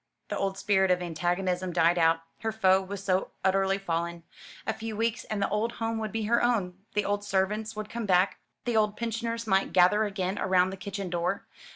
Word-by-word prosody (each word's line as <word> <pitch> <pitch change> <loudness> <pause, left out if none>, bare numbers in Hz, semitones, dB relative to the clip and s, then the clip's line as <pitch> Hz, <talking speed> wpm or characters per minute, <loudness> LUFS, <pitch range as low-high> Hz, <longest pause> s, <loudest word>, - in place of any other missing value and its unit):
The - - -2
old 195 -1 -1
spirit 190 -1 +2
of 180 0 +3
antagonism 180 +2 -1
died 170 0 +3
out: 165 0 +4 0.2
her 225 -1 -1
foe 190 -3 +4
was 195 +1 -6
so 185 -1 +1 0.2
utterly 195 0 +3
fallen. 170 -2 -3 0.4
A - - 0
few 220 -1 -6
weeks 230 +1 -1
and 215 - -3
the - - 0
old 215 +3 0
home 225 0 -2
would 215 -1 -3
be 225 +1 -2
her 235 +3 +2
own 195 -7 0 0.2
the 210 - +1
old 205 0 0
servants 210 +3 -1
would 215 -1 -4
come 235 -2 -3
back, 185 +1 +3 0.3
the 240 -2 0
old 210 -1 +2
pensioners 230 0 -2
might 195 -2 +1
gather 190 +4 +5
again 195 -1 -2
around 185 -1 +3
the - - -5
kitchen 195 -1 -5
door. 175 +3 -1
195 Hz, 205 wpm, -28 LUFS, 185-215 Hz, 0.4 s, gather